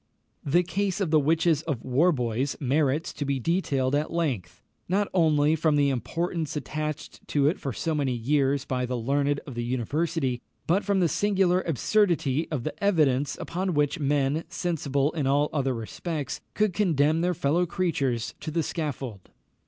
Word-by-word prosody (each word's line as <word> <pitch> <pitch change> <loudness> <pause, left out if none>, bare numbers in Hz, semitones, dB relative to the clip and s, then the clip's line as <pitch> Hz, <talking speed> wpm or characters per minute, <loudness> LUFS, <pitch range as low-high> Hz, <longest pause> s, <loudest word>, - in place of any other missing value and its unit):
The 170 +6 +3
case 195 +2 -1
of 185 -6 -1
the 155 - +6
witches 160 +1 +2
of 145 -8 -3
Warbois 130 -3 +1
merits 145 +2 +1
to - - -4
be 140 -1 -1
detailed 140 -4 0
at 150 +2 0
length, 120 - -2 0.3
not 200 +2 +2
only 155 -3 +3
from 155 -1 +2
the 140 -1 +3
importance 165 +5 -2
attached 150 +1 -5
to 145 -2 +1
it 160 - +1
for 135 - -3
so 160 +6 -2
many 140 -4 0
years 140 +3 +1
by 125 -1 -1
the 125 0 -2
learned 140 +4 0
of 135 - -8
the 120 0 -3
University, 130 +2 -1 0.2
but 185 +5 +2
from 200 -2 +1
the 175 - +4
singular 190 -1 +2
absurdity 165 - +1
of 145 -7 -3
the - - -3
evidence 145 -8 +2
upon 180 0 -2
which 150 +3 +1
men, 145 +2 +1
sensible 145 -5 -1
in 150 -5 -2
all 145 +2 +2
other 135 -4 0
respects, 140 +5 -4
could 210 -3 +2
condemn 160 -4 +2
their 180 0 +1
fellow 165 +5 +1
creatures 140 -10 -1
to 155 - -5
the 165 +1 0
scaffold. 135 - -4
150 Hz, 170 wpm, -26 LUFS, 135-170 Hz, 0.3 s, the